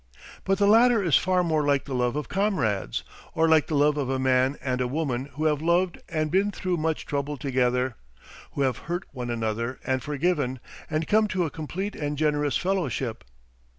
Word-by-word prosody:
But 195 0 +2
the 205 - +3
latter 225 +1 +5
is 170 -6 +3
far 185 0 +3
more 160 -3 +1
like 140 -1 +1
the 135 - -5
love 125 0 0
of 150 -4 -3
comrades, 155 - 0 0.3
or 165 0 +3
like 160 -2 +4
the 155 - -1
love 145 +1 +3
of 140 -3 -1
a 135 - 0
man 130 +1 +2
and 130 -1 -2
a 125 - +1
woman 135 -2 -2
who 155 +4 -3
have 150 -1 +2
loved 175 +2 +1
and 155 -2 -1
been 195 +3 +3
through 185 -3 -2
much 160 0 -1
trouble 145 +1 -2
together, 125 -1 0 0.6
who - - -2
have 130 -3 0
hurt 175 +2 -1
one 125 -3 -5
another 115 +2 -2
and 130 -1 0
forgiven, 145 -3 -1 0.3
and 155 0 -1
come 215 0 +3
to 185 -3 0
a 155 - -4
complete 185 +6 -4
and 145 0 -3
generous 150 -1 +1
fellowship. 170 - -2
150 Hz, 195 wpm, -26 LUFS, 130-175 Hz, 0.6 s, latter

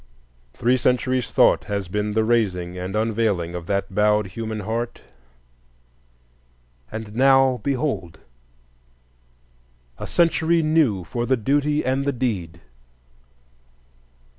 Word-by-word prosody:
Three 125 +2 +2
centuries' 125 0 0
thought - - +4
has 100 -2 -3
been 105 +3 -2
the 110 +1 +2
raising 95 -6 0
and 90 +2 -5
unveiling 105 -6 0
of 85 -1 -6
that 100 -1 -2
bowed 105 +1 +2
human 110 +2 -5
heart, 115 +3 -4 1.9
and 110 -1 -7
now 135 0 +4
behold 125 - -2 1.8
a - - -5
century 170 -1 +2
new 155 - +2
for 120 +7 -4
the 130 - +2
duty 145 +5 0
and 130 +2 0
the 140 0 -1
deed. 95 -10 -3
110 Hz, 110 wpm, -22 LUFS, 100-130 Hz, 1.9 s, thought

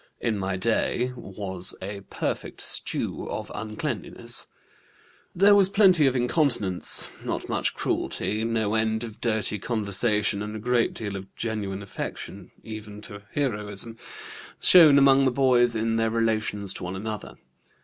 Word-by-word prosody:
In 110 -4 -1
my 95 0 -2
day 115 +4 0
was 95 -5 -3
a 100 +1 -6
perfect - - -4
stew - - +1
of - - -5
uncleanness. 110 0 -4 0.9
There 200 +3 +6
was 195 -2 +5
plenty 185 -7 +5
of 130 - +1
incontinence, 125 - +2 0.2
not - - -4
much - - -1
cruelty, 110 +1 -2
no 110 -2 0
end 110 0 0
of 110 -2 -9
dirty 110 -3 0
conversation, 105 -1 -1
and 105 +1 -5
a - - -5
great 120 +1 +1
deal 100 -3 -4
of 95 0 -9
genuine 100 -4 -4
affection, 100 - -7
even 105 -1 -9
to 105 -2 -7
heroism, 105 -5 0 0.6
shown 160 -6 +8
among 135 0 +5
the 130 - +3
boys 125 -2 +3
in 115 +1 0
their 115 0 +1
relations 110 -3 -1
to - - -8
one 90 +1 -4
another. 105 +1 -6
110 Hz, 140 wpm, -25 LUFS, 105-125 Hz, 0.9 s, shown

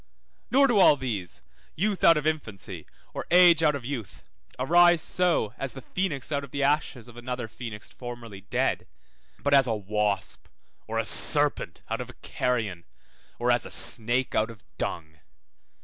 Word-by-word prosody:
Nor 275 +2 +5
do 240 -6 +3
all 150 - +7
these, 105 -10 -5 0.3
youth 200 +3 -1
out 165 -1 +7
of 150 - -2
infancy, 110 - -4 0.3
or - - -5
age 175 -2 +7
out 150 -2 +3
of 130 -4 -6
youth, 125 -7 -6 0.3
arise 175 +6 +5
so, 170 - +1
as 135 -1 -3
the 135 - -8
phoenix 155 -6 -3
out 140 -1 -1
of 140 - -9
the 140 +1 -2
ashes 140 -4 0
of 120 -1 -14
another 125 -1 -4
phoenix 110 -1 -9
formerly 120 -5 -9
dead, 100 - -1 0.5
but 145 - -1
as 135 -2 +6
a 115 - 0
wasp 105 -1 -2 0.4
or - - -3
a - - 0
serpent - - +1
out - - -3
of - - -7
a - - -12
carrion, 110 -9 -2 0.5
or 120 +1 +1
as 120 -1 +2
a - - -2
snake 120 +3 +1
out 110 +1 +1
of 115 -4 -12 0.2
dung. 75 -2 -4
125 Hz, 170 wpm, -27 LUFS, 110-155 Hz, 0.5 s, all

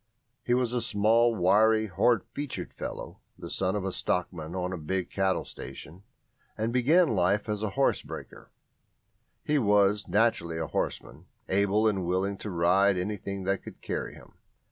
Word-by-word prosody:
He 120 0 +1
was 125 -1 0
a 125 - 0
small, 115 +2 +3
wiry, 110 +4 +4
hard 105 +3 +2
featured 145 -2 -5
fellow, - - -7 0.2
the - - -8
son 95 +1 0
of 100 -2 -2
a 95 - -1
stockman 85 -2 -2
on 90 0 -2
a - - -3
big 90 +4 -3
cattle 95 -1 0
station, 80 +7 -9 0.6
and 110 +2 -1
began 155 +7 +4
life 100 +1 +1
as 105 -1 -2
a 110 - -1
horse - - +2
breaker; - - -10 0.9
he 150 -1 +1
was 105 -2 +3
naturally 105 -7 +1
a 80 - -2
horseman, - - -4 0.2
able 100 +3 +2
and 100 -4 0
willing 95 +3 0
to 105 - -6
ride 95 +3 +3
anything 100 0 -4
that 95 +1 -1
could - - -11
carry - - -4
him. - - -17
100 Hz, 165 wpm, -28 LUFS, 95-110 Hz, 0.9 s, wiry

